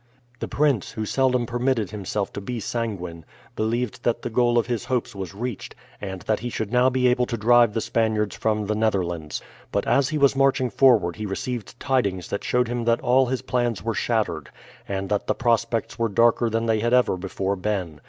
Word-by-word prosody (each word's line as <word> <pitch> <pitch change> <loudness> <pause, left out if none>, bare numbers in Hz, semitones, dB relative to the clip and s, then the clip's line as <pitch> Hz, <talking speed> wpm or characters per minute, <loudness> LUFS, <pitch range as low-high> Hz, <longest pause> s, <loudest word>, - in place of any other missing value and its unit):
The - - -3
prince, 140 -8 +1
who 110 -1 -3
seldom 125 +1 +1
permitted 120 -4 0
himself 100 0 -3
to 100 - -5
be 120 +4 -4
sanguine, 100 -7 -4 0.3
believed 115 +1 -1
that 120 - -1
the - - -3
goal 120 +1 +3
of 120 - +3
his 120 -5 -3
hopes 125 -2 -1
was 95 -1 -6
reached, 120 +1 -5 0.3
and 95 -2 -6
that 110 - 0
he 120 - -4
should 110 -2 -4
now 125 +1 +4
be 130 0 +2
able 125 0 +2
to 115 - -3
drive 120 0 +4
the 115 - +1
Spaniards 110 -2 0
from 105 -1 0
the 105 - 0
Netherlands. 90 -8 -1 0.3
But - - 0
as 140 -1 +2
he 155 - -1
was 140 -2 +4
marching 135 -2 +2
forward 115 -10 +4
he 110 -1 -4
received 115 +2 -5
tidings 100 -9 0
that 100 - -3
showed 125 -1 +1
him 120 0 -3
that 115 0 +2
all 130 +1 +3
his 130 0 -2
plans 120 -5 -1
were 115 +1 -1
shattered, 110 0 -1 0.4
and 95 -1 -3
that 105 -1 -1
the - - +1
prospects 115 -1 0
were 115 -1 +1
darker 115 +2 +3
than 115 +1 -1
they 110 -1 +2
had 120 +3 +2
ever 125 -6 +3
before 95 +1 -2
been. 90 -5 -3
115 Hz, 205 wpm, -24 LUFS, 100-125 Hz, 0.4 s, now